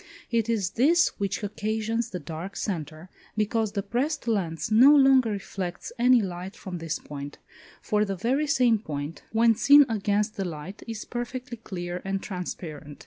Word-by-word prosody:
It 230 -1 +1
is 205 -5 0
this 325 +8 +4
which 200 +1 -2
occasions 220 +2 -2
the 185 - -4
dark 165 +5 -7
centre, 160 -4 -4 0.3
because 215 0 0
the 200 -2 -2
pressed 260 +7 -2
lens 190 -4 -1
no 260 +7 +8
longer 265 -4 +5
reflects 195 -3 -5
any 245 -1 +5
light 185 +2 -6
from 185 -5 -7
this 165 -1 -3
point, 145 -1 -8 0.5
for 210 0 +2
the 195 -2 -2
very 260 - 0
same 250 -7 +3
point, 150 -4 -5
when 230 +1 +4
seen 285 +6 +7
against 210 -1 0
the 195 - -1
light, 170 +3 -7
is 225 -2 -5
perfectly 245 0 -5
clear 180 -4 -5
and 195 0 -2
transparent. 160 -5 -6
210 Hz, 160 wpm, -26 LUFS, 180-235 Hz, 0.5 s, no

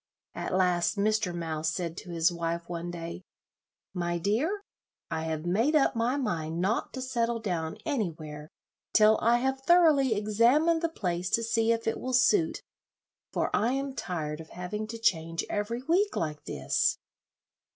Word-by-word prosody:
At - - -3
last 180 +1 +2
Mr. 215 -2 +1
Mouse 160 -2 -2
said 165 +1 -3
to - - -8
his 165 0 +2
wife 170 0 -3
one 170 0 -4
day, 170 0 -6 0.7
"My 175 -2 -1
dear, 260 - 0 0.5
I 160 - -2
have 160 0 -3
made 225 - +2
up 290 - +3
my 235 +4 +1
mind 165 - -2
not 195 +6 0
to 260 - -4
settle 235 -2 -1
down 175 -7 -3
anywhere 160 - -3 0.4
till 215 0 +6
I 235 +2 +4
have 265 +2 -1
thoroughly 295 -6 +5
examined 240 +11 +3
the 335 - +1
place 180 - -2
to 230 - +2
see 225 0 +2
if 230 0 0
it 225 - -1
will 255 0 -4
suit, 320 +8 +3 0.7
for - - 0
I 235 +4 +2
am 275 0 -2
tired 165 -9 -4
of 160 - -13
having 210 +5 -5
to 230 +1 -6
change 165 -7 0
every 230 +4 -2
week 365 +8 +2
like 150 -2 -3
this." - - 0
210 Hz, 160 wpm, -29 LUFS, 170-250 Hz, 0.7 s, till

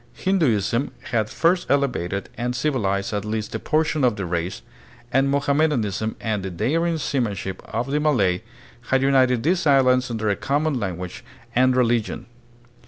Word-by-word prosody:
Hinduism 130 - +1 0.2
had 110 -3 +1
first 175 +6 +1
elevated 125 -9 0
and 125 +1 -2
civilized 105 -9 -1
at 105 -1 -1
least 110 0 -3
a 110 - -2
portion 155 +1 0
of 120 -4 +3
the 100 -3 -4
race, 85 +1 -3 0.5
and 135 +2 +3
Mohamme 140 +2 +2
danism 110 -5 -2
and 110 -3 -2
the 95 - -4
daring 165 - 0
seamanship 105 - -2
of 120 +4 -3
the 150 - +1
Malay 105 -12 +2 0.5
had 135 0 +3
united 130 -3 +3
these 170 +1 +1
islands 130 -2 +4
under 110 -2 -2
a - - +1
common 145 +2 0
language 90 -3 -5 0.3
and 130 +1 +3
reli 120 -2 +3
gion. - - -7
125 Hz, 160 wpm, -23 LUFS, 105-140 Hz, 0.5 s, islands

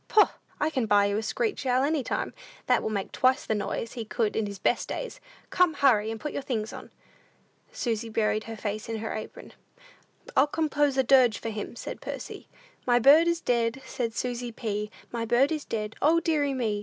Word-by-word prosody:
Poh! 425 - +5 0.3
I 305 +1 +1
can 255 -7 0
buy 205 -1 +5
you 200 0 0
a - - 0
screech 430 - -2
owl 255 +1 +3
any 300 +1 +1
time, - - -2 0.3
that - - +3
will - - -2
make 200 -3 -3
twice 260 +2 +2
the - - 0
noise 210 +2 -3
he 235 - -4
could 220 0 -1
in 220 -2 0
his 200 -1 -6
best 220 - 0
days. - - -5 0.3
Come, 355 -4 +3
hurry, 225 -7 +4
and 225 0 -4
put 300 - -5
your - - -2
things 225 -5 -3
on!" - - -9 0.8
Susy 230 -2 -2
buried 215 -1 0
her 225 -1 -7
face 215 +1 -4
in 225 - -2
her 220 0 -4
apron. 215 - -8 0.8
"I'll - - +5
compose 295 -3 +1
a 265 - +4
dirge 255 -3 +5
for 230 - -4
him," 215 +1 -5
said - - -7
Percy. - - -7 0.4
"My 240 -1 +5
bird 285 +7 +7
is 340 0 +1
dead, 235 +2 0
said 230 -3 -3
Susy 245 -1 -3
P., 210 -2 -3 0.2
My 235 -1 -2
bird 240 +5 +3
is 305 -2 -2
dead; 210 -1 -4
O, 320 +3 +5
deary 300 -4 +1
me! 220 -5 -1
240 Hz, 205 wpm, -27 LUFS, 220-280 Hz, 0.8 s, bird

